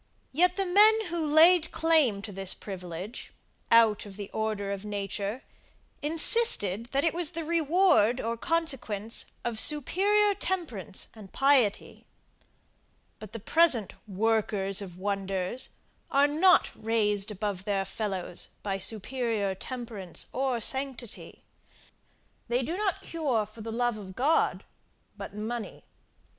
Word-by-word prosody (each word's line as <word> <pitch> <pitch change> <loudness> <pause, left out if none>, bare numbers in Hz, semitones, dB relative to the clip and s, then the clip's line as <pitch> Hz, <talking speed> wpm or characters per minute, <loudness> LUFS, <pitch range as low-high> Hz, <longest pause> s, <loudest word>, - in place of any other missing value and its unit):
Yet 355 +6 +2
the 390 - 0
men 430 +4 +5
who 340 -1 -2
laid 320 +3 +5
claim 300 -11 +2
to 210 - -6
this 195 -1 +1
privilege, 185 +2 -8 0.4
out 225 -3 +4
of 195 - -11
the 205 -1 -7
order 215 -2 -2
of 200 0 -5
nature, 205 +2 -4 0.6
insisted, 295 - +3
that 275 +3 -1
it 330 - +1
was 345 -1 -2
the 330 0 -3
reward 320 - +3
or 230 +1 -2
consequence 240 - -1 0.2
of 235 -2 -1
superior 400 - +3
temperance 305 - -4
and 210 -4 -13
piety. 270 -7 +1 1.1
But 215 -2 -10
the 230 - -7
present 250 - +2
workers 205 -1 0
of 180 -3 -9
wonders 195 +3 -2 0.4
are 280 +1 +4
not 340 +5 +4
raised 210 -2 0
above 200 -2 -4
their 195 -2 -1
fellows 190 -4 -4 0.2
by 195 -1 -2
superior 220 0 -1
temperance 220 -3 -6
or 260 -2 -1
sanctity. 265 -2 -2 1.0
They 245 +2 0
do 325 +8 -3
not 390 -2 -2
cure 275 -10 -1
for 215 +2 -14
the 225 +1 -6
love 240 0 -1
of 190 -3 -10
God, 295 +8 +1 0.5
but - - -9
money. 220 +2 -6
230 Hz, 125 wpm, -28 LUFS, 200-310 Hz, 1.1 s, men